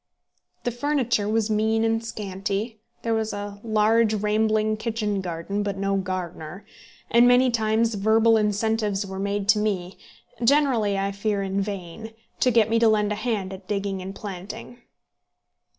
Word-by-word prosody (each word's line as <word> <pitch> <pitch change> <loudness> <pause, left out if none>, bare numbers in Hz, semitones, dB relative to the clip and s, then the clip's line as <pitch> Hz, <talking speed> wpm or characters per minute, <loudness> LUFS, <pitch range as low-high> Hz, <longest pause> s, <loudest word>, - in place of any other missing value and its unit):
The 245 - -1
furniture 240 -5 0
was 220 0 +1
mean 220 +1 +2
and 225 0 +1
scanty. 205 +1 -4 0.2
There 230 - 0
was 220 -1 -1
a 205 0 -6
large 220 0 +3
rambling 215 +1 +1
kitchen 215 -3 -2
garden, 180 +3 -3
but 200 -1 -3
no 195 0 0
gardener; 185 -2 -5 0.5
and 235 +1 +6
many 250 +1 +5
times 225 0 +1
verbal 220 +2 +4
incentives 210 -1 0
were 190 0 -6
made 200 0 -2
to 215 0 +5
me, 195 -4 -2 0.4
generally, 240 -6 +3
I 195 0 -1
fear, 200 0 -1
in 195 +1 -1
vain, 200 +2 -6 0.3
to 255 - +4
get 230 -3 +4
me 230 +1 +2
to 230 - +5
lend 210 -1 +2
a - - +2
hand 205 -4 -2
at 190 0 -11
digging 200 -2 -2
and 190 +1 -7
planting. 205 +5 -8
210 Hz, 155 wpm, -24 LUFS, 195-225 Hz, 0.5 s, and